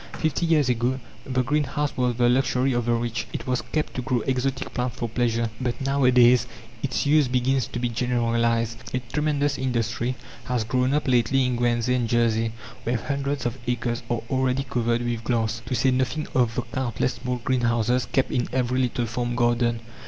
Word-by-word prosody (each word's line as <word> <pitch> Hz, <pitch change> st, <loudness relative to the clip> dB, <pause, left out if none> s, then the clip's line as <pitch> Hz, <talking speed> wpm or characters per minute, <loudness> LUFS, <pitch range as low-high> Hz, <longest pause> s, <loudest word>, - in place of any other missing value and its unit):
Fifty 160 Hz, +2 st, 0 dB
years 155 Hz, -5 st, +3 dB
ago 125 Hz, +2 st, 0 dB, 0.3 s
the 130 Hz, -1 st, +1 dB
greenhouse 145 Hz, +2 st, -1 dB
was 125 Hz, -1 st, +1 dB
the 120 Hz, 0 st, +3 dB
luxury 130 Hz, +1 st, +2 dB
of 120 Hz, -1 st, -1 dB
the -, -, +3 dB
rich. 115 Hz, 0 st, -2 dB
It -, -, -4 dB
was 125 Hz, -1 st, 0 dB
kept 155 Hz, -1 st, -2 dB
to 125 Hz, -, -3 dB
grow 125 Hz, -1 st, 0 dB
exotic 130 Hz, +2 st, -1 dB
plants 125 Hz, -1 st, -2 dB
for 120 Hz, -, -2 dB
pleasure. 115 Hz, -1 st, 0 dB
But 125 Hz, -2 st, -2 dB
nowadays 125 Hz, -3 st, +4 dB, 0.3 s
its 130 Hz, 0 st, -1 dB
use 145 Hz, -1 st, +4 dB
begins 130 Hz, +1 st, +1 dB
to -, -, -6 dB
be 120 Hz, 0 st, 0 dB
generalized. 115 Hz, -1 st, 0 dB, 0.2 s
A -, -, +1 dB
tremendous 145 Hz, -2 st, 0 dB
industry 120 Hz, -1 st, -1 dB, 0.3 s
has 125 Hz, -3 st, 0 dB
grown 125 Hz, +4 st, +1 dB
up 150 Hz, -, 0 dB
lately 130 Hz, +1 st, +3 dB
in 125 Hz, -1 st, 0 dB
Guernsey 120 Hz, 0 st, +1 dB
and 120 Hz, -3 st, 0 dB
Jersey, 115 Hz, -1 st, +2 dB, 0.3 s
where 120 Hz, +1 st, 0 dB
hundreds 140 Hz, +2 st, -2 dB
of 120 Hz, +2 st, -2 dB
acres 120 Hz, -1 st, -1 dB
are 120 Hz, -2 st, -1 dB
already 130 Hz, 0 st, +1 dB
covered 120 Hz, -2 st, 0 dB
with 120 Hz, -1 st, -2 dB
glass 115 Hz, -1 st, 0 dB
to 130 Hz, -, -1 dB
say 130 Hz, +3 st, +3 dB
nothing 130 Hz, +4 st, 0 dB
of 120 Hz, -3 st, +2 dB
the 125 Hz, -, -1 dB
countless 125 Hz, 0 st, -2 dB
small 125 Hz, 0 st, -2 dB
greenhouses 120 Hz, -1 st, +1 dB
kept 135 Hz, -, 0 dB
in 125 Hz, -, 0 dB
every 125 Hz, 0 st, 0 dB
little 120 Hz, -1 st, 0 dB
farm 120 Hz, +1 st, -2 dB
garden. 120 Hz, -1 st, +1 dB
125 Hz, 185 wpm, -25 LUFS, 120-130 Hz, 0.3 s, nowadays